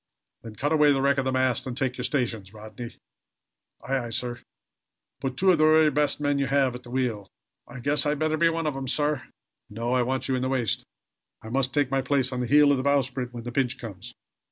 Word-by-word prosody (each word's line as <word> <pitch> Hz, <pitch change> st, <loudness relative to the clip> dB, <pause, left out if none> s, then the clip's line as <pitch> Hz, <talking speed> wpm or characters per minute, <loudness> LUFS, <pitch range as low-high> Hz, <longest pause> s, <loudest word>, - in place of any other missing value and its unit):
"Then 110 Hz, -2 st, -10 dB
cut 145 Hz, +7 st, -1 dB
away 150 Hz, -2 st, +5 dB
the 135 Hz, -, +2 dB
wreck 140 Hz, 0 st, +3 dB
of 135 Hz, -, -1 dB
the 130 Hz, -, 0 dB
mast 130 Hz, -1 st, 0 dB
and 125 Hz, -1 st, -5 dB
take 130 Hz, -2 st, -1 dB
your 125 Hz, -, -5 dB
stations, 115 Hz, -8 st, -2 dB
Rodney!" 110 Hz, +2 st, -9 dB, 0.9 s
"Aye, 135 Hz, -2 st, -1 dB
aye, -, -, -6 dB
sir!" 120 Hz, +1 st, -3 dB, 0.8 s
"Put 130 Hz, -1 st, -4 dB
two 190 Hz, +3 st, +4 dB
of 170 Hz, -, +2 dB
the -, -, +4 dB
very 155 Hz, 0 st, +5 dB
best 145 Hz, 0 st, +1 dB
men 145 Hz, -1 st, 0 dB
you 140 Hz, -, 0 dB
have 135 Hz, -2 st, +2 dB
at 125 Hz, -, -8 dB
the -, -, -13 dB
wheel." 120 Hz, -6 st, -2 dB, 0.4 s
"I 125 Hz, -, -9 dB
guess 145 Hz, +3 st, +1 dB
I'd 150 Hz, 0 st, +1 dB
better 155 Hz, +1 st, 0 dB
be 165 Hz, +1 st, +3 dB
one 165 Hz, 0 st, -2 dB
of 150 Hz, -3 st, -1 dB
'em, 135 Hz, -1 st, -5 dB
sir." 145 Hz, 0 st, 0 dB, 0.5 s
"No. 115 Hz, +4 st, -3 dB
I 130 Hz, -, +3 dB
want 130 Hz, +2 st, -1 dB
you 130 Hz, -, +1 dB
in 125 Hz, -, -1 dB
the 130 Hz, -, -1 dB
waist. 125 Hz, -6 st, 0 dB, 0.6 s
I 110 Hz, -, -8 dB
must 130 Hz, +2 st, 0 dB
take 145 Hz, -3 st, 0 dB
my 135 Hz, 0 st, +2 dB
place 130 Hz, 0 st, 0 dB
on 125 Hz, -, -3 dB
the 125 Hz, -, -1 dB
heel 145 Hz, +2 st, +6 dB
of 140 Hz, -, +3 dB
the 130 Hz, -, -2 dB
bowsprit, 135 Hz, -3 st, 0 dB
when 120 Hz, -1 st, -8 dB
the 120 Hz, -, -5 dB
pinch 130 Hz, 0 st, 0 dB
comes." 115 Hz, 0 st, -9 dB
130 Hz, 245 wpm, -26 LUFS, 120-145 Hz, 0.9 s, heel